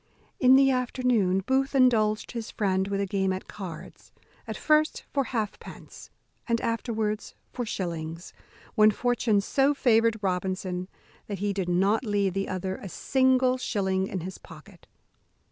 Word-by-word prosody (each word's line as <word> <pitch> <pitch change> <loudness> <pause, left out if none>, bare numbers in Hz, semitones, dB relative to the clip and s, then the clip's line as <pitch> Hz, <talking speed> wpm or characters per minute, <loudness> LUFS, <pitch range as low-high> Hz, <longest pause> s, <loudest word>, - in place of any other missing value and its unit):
In 255 0 +7
the 270 0 +5
afternoon 245 -7 +1
Booth 270 +1 +1
indulged 220 -5 +3
his 230 -2 -5
friend 190 -2 0
with 200 0 -2
a 200 - 0
game 190 0 0
at 185 0 -5
cards; 185 -6 -9 0.4
at - - -5
first 305 0 +2
for 275 -2 +1
halfpence 220 -5 -6 0.4
and 230 -1 +1
afterwards 225 -2 -2 0.2
for 245 -2 -4
shillings, 165 -3 -5 0.4
when 215 -1 +6
fortune 230 -1 +1
so 275 +7 +2
favoured 230 -3 +3
Robinson 185 -1 -2 0.4
that 205 - -4
he 200 +1 -1
did 190 -2 -2
not 195 +6 +2
leave 205 -4 0
the 195 +1 -2
other 185 0 -3
a 195 - -8
single 260 +2 +2
shilling 190 -5 -1
in 185 - -4
his 185 +2 -7
pocket. 170 +2 -15
210 Hz, 145 wpm, -27 LUFS, 190-250 Hz, 0.4 s, In